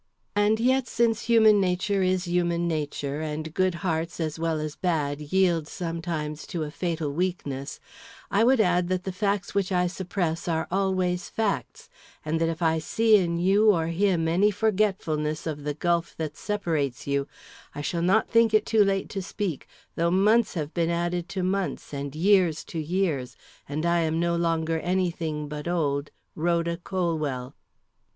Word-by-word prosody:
And 205 +2 +3
yet 260 +1 +2
since 230 -1 +1
human 220 -3 +5
nature 190 +2 0
is 185 0 +1
human 175 -1 0
nature, 150 -2 -2
and 155 0 -4
good 185 -1 +1
hearts 165 0 -1
as 160 -1 -2
well 165 -1 0
as 150 -1 -4
bad 150 -5 -1
yield 170 0 +1
sometimes 165 -4 -4
to 165 -3 -3
a 150 - -5
fatal 165 -3 -2
weakness, 145 -6 -3 0.5
I 205 +3 +3
would 255 +1 +4
add 180 -3 +3
that 185 0 -1
the 190 - -3
facts 200 0 -1
which 200 -1 0
I 180 -1 +2
suppress 175 -2 -2
are 160 -1 0
always 185 -2 0
facts, 220 -3 -2 0.4
and 160 +1 -1
that 165 - +2
if 165 +1 -3
I 160 0 +2
see 220 +7 +4
in 170 -3 0
you 195 +5 +4
or 165 -5 +2
him 170 -1 +1
any 185 +6 +3
forgetfulness 190 -8 0
of 150 -3 -4
the 150 -1 -2
gulf 170 +1 0
that 155 -2 -4
separates 160 - -2
you, 140 0 0 0.5
I 145 - -4
shall 170 +4 -2
not 190 +6 +3
think 230 -1 +4
it 215 0 +3
too 220 -2 +4
late 195 -1 0
to 195 - -4
speak, 190 -5 -4 0.3
though 170 +1 +1
months 210 +5 +3
have 155 -2 -3
been 170 -1 +1
added 175 0 -1
to 190 -2 -3
months, 185 -4 -2
and 140 0 -5
years 180 -2 +3
to 165 - -6
years, 155 -5 -1 0.3
and 155 +3 -2
I 170 0 +3
am 160 0 0
no 170 0 +1
longer 165 -1 0
any 180 +1 0
thing 155 -3 -4
but 150 +2 -6
old 145 -5 0 0.3
RHODA 170 +1 0
COLWELL. 155 -8 -2
170 Hz, 175 wpm, -26 LUFS, 155-190 Hz, 0.5 s, human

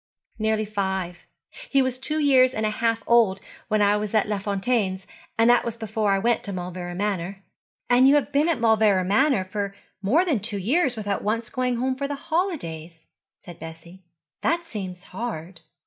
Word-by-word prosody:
'Nearly 220 0 +1
five. 190 -4 -3 0.4
He 275 -1 +3
was 255 -1 -2
two 305 +4 0
years 260 -3 +4
and 220 - -1
a 215 - +1
half 230 +1 0
old 225 -5 +4 0.3
when 215 -1 +2
I 205 +1 +4
was 210 +1 -3
at 215 - +3
Les 205 -2 -2
Fontaines, 200 -2 -1 0.3
and 225 0 +4
that 245 - +4
was 235 -1 -4
before 220 -1 -1
I 195 - +3
went 235 +4 +1
to 200 - -4
Mauleverer 180 -1 -5
Manor.' 195 -1 -3 0.4
'And 250 +2 +5
you 280 - +6
have 290 0 +1
been 290 +4 +2
at 320 -7 0
Mauleverer 220 -4 +3
Manor 200 -3 +1 0.3
more 285 - +3
than 300 - +1
two 210 +1 -1
years 255 - +1
without 205 -2 -3
once 225 +2 -1
going 250 -1 0
home 260 +2 -1
for 280 +1 -3
the 285 - -3
holidays,' 180 - -4 0.3
said 175 -2 -13
Bessie. 165 +3 -11 0.4
'That 340 +3 0
seems 190 - -7
hard.' 185 -5 -6
215 Hz, 180 wpm, -24 LUFS, 190-255 Hz, 0.4 s, you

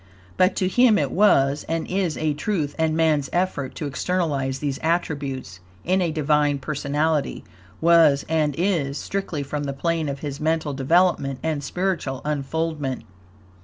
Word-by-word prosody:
But 185 +1 +3
to 185 - +1
him 230 +3 +4
it - - 0
was, 145 -8 +3
and 165 0 -1
is, 185 -4 -1
a 155 -1 0
truth, 150 -2 -2
and 160 0 +1
man's 155 -4 +2
effort 175 -7 -1
to 155 - -4
externalize 140 -3 -1
these 140 -1 -3
attributes 140 - -2 0.3
in 185 +2 +2
a 170 -2 0
Divine 150 -1 +2
personality 150 +2 -1 0.4
was, 160 -4 +5
and 155 -3 +1
is, 165 -6 0
strictly 185 -7 -3
from 145 +1 -4
the 140 - -3
plane 165 +1 -1
of 140 -1 -5
his 145 -2 -5
mental 155 -1 0
development 140 -1 +2
and 155 -3 -1
spiritual 160 -5 -2
unfoldment. 150 -1 -2
150 Hz, 150 wpm, -23 LUFS, 140-170 Hz, 0.4 s, was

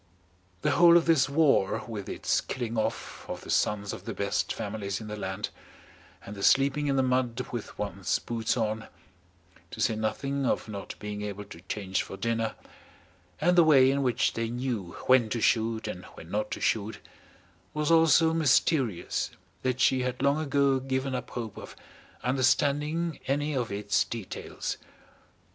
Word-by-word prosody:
The - - +3
whole 170 0 +7
of 170 - +2
this 160 -5 +4
war, 140 -9 +3
with 105 -4 -6
its - - 0
killing 120 -2 -4
off 110 - -3
of - - -5
the - - -6
sons 100 -1 +1
of - - -9
the - - -5
best - - -1
families 100 -1 -3
in 110 - -8
the 105 0 -5
land, 100 0 -4 0.8
and 105 - -7
the 100 - -8
sleeping 140 +5 +3
in 140 - +1
the 135 - +3
mud 125 -2 0
with 120 -3 -6
one's 100 -2 -1
boots 115 +1 -2
on, 110 -1 -1 0.8
to - - -9
say 115 - +2
nothing 135 +6 -2
of 125 - 0
not 100 -2 -6
being 105 0 -5
able 105 -1 -5
to 85 -4 -12
change 95 -2 -1
for 95 - -8
dinner, 115 0 -1 0.8
and 175 +3 +3
the 175 - +7
way 135 -4 +6
in 140 +1 0
which 125 -3 +1
they 115 0 -2
knew 120 -7 -3
when 130 -4 +5
to 120 - -1
shoot 115 0 +1
and 90 - -6
when 80 - -11
not 105 +1 -1
to - - -4
shoot, 110 0 0 0.7
was 150 +1 0
all 165 0 +6
so 160 +1 +5
mysterious 135 - +2 0.3
that 130 -1 -1
she 130 0 +4
had 125 +1 -2
long 140 +2 +3
ago 140 -3 +2
given 130 0 -2
up 125 -1 -4
hope 115 -4 -6
of - - -10 0.5
understanding 145 +5 +1
any 145 +2 0
of 120 -4 -1
its 100 0 +1
details. 115 -5 -5
125 Hz, 170 wpm, -28 LUFS, 105-140 Hz, 0.8 s, whole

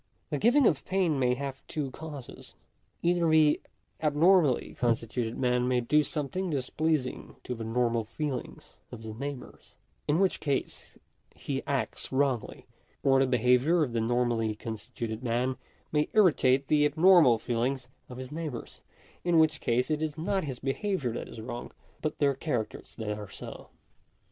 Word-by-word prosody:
The - - -1
giving 245 +5 +5
of 150 -10 +3
pain 180 -7 +1
may 125 -1 +2
have 135 0 -5
two 145 -4 -3
causes. 145 -4 -10 0.5
Either 170 -1 +3
the 155 -1 +4 0.4
abnormally 155 -2 +3
constituted 115 -1 -1
man 125 -1 +1
may 125 -1 +2
do 150 +6 +3
something 155 +5 -2
displeasing 145 0 -1
to 125 - -4
the 115 -2 -6
normal 115 0 +1
feelings 140 +4 -5 0.2
of 115 -2 -9
his 110 -1 -6
neighbours, 140 +3 -8 0.3
in 150 - +3
which 190 0 +2
case 140 -3 -3 0.4
he - - -3
acts - - -2
wrongly; 130 -3 0 0.4
or 135 -1 +5
the 135 - +3
behaviour 125 +7 +3
of 125 -5 -3
die 115 - +1
normally 115 -1 +1
con 110 +1 -5
stituted 110 0 -6
man 125 +1 0 0.4
may 150 -1 +2
jrritate 140 -10 +4
the 150 +1 +3
abnormal 155 -4 +6
feelings 125 +3 -2 0.2
of 125 - -8
his 130 +1 -7
neigh 160 +1 -3
bours; 120 -4 -9 0.4
in 175 -1 +3
which 160 -1 +3
case 125 +5 +1
it 155 0 0
is 155 -1 -2
not 190 +2 -1
his 130 -4 -5
behaviour 140 - -1
that - - -5
is - - -9
wrong, 120 +1 -6 0.3
but 155 - -2
their 140 -1 +3
characters 125 -6 -4
that 105 -2 -4
are 105 -2 -8
so. - - -9
135 Hz, 160 wpm, -29 LUFS, 120-155 Hz, 0.5 s, abnormal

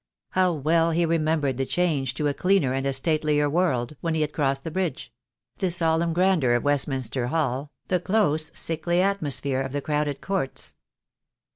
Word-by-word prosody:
How 185 -1 +3
well 165 +2 +2
he 170 +1 +1
remembered 155 -5 0
the 135 - 0
change 145 -8 0
to 150 +1 0
a 145 - 0
cleaner 180 -6 +2
and 135 +1 -1
a - - +1
statelier 150 +1 +1
world 145 -5 0
when 165 -1 -1
he 160 - 0
had 150 0 -1
crossed 135 -2 0
the 165 - -5
bridge 175 -9 -3 0.2
— 120 +2 -55
the 190 - +1
solemn 165 -1 +1
grandeur 170 -7 +2
of 120 - 0
Westminster 135 -4 0
Hall, 140 -2 -1 0.2
the 180 - +1
close, 160 -5 +1
sickly 165 +2 0
atmosphere 145 -8 0
of 135 0 -5
the 145 - 0
crowded 150 -1 -1
courts. 190 -9 -3
155 Hz, 175 wpm, -25 LUFS, 135-170 Hz, 0.2 s, How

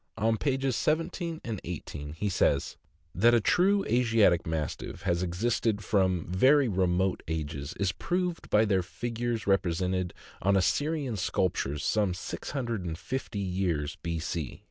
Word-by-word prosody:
On 110 +2 +2
pages 135 +1 0
17 165 +1 -1
and 110 -5 -4
18 75 -4 -6
he 90 +6 -2
says: 95 - +1 0.2
" - - -39
That 120 +2 +7
a - - +5
true 195 - +3
Asiatic 115 -8 +3
Mastiff 80 -2 -4
has 85 0 +1
existed 105 +4 0
from 95 -6 +1
very 130 - +4
remote 95 -1 +1
ages 75 -1 -4
is 100 -2 +2
proved 180 - -2
by 105 +1 +4
their 95 -3 +2
figures 120 +4 -3
represented 90 -1 0 0.3
on 100 +1 +3
Assyrian 145 - 0
sculptures 75 -6 -1
some 105 -4 +1
650 115 - -4
years 90 -5 -1
B. 85 0 -2
C. 80 -3 -4
100 Hz, 135 wpm, -29 LUFS, 90-120 Hz, 0.3 s, That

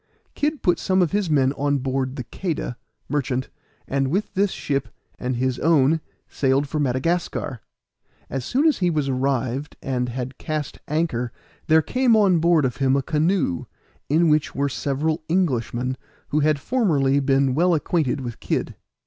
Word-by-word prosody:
Kid 300 0 -1
put 175 -3 +3
some 190 -1 +1
of 170 - -1
his 205 -3 0
men 135 -3 +3
on 145 0 0
board 130 0 -2
the 125 - -4
Queda, 160 -2 -4 0.3
merchant, 135 -2 -1 0.4
and 135 0 0
with 190 +10 -1
this 200 +1 +2
ship 140 -6 -2 0.3
and 125 0 -2
his 130 +1 -1
own 160 0 +3 0.3
sailed 135 +1 +1
for 155 +2 -2
Madagascar. 135 -2 -1 0.7
As 135 -2 -3
soon 270 - +1
as 310 - +2
he 180 -2 +2
was 150 -4 0
arrived 130 +1 -1
and 125 -2 -2
had 125 +1 -5
cast 155 -2 -4
anchor 145 -6 -1 0.4
there 160 0 +5
came 250 - +3
on 195 -5 +4
board 165 -3 +4
of 125 - -2
him 135 -1 +2
a 140 - +1
canoe, 155 - 0 0.4
in 165 +4 +4
which 150 -1 +2
were 140 +1 +1
several 150 +4 -1
Englishmen 130 -7 0 0.3
who 150 - +1
had 155 0 +3
formerly 145 - +2
been 135 -1 +2
well 175 +4 +3
acquainted 150 -4 0
with 120 -3 -6
Kid. - - -2
145 Hz, 165 wpm, -23 LUFS, 130-165 Hz, 0.7 s, there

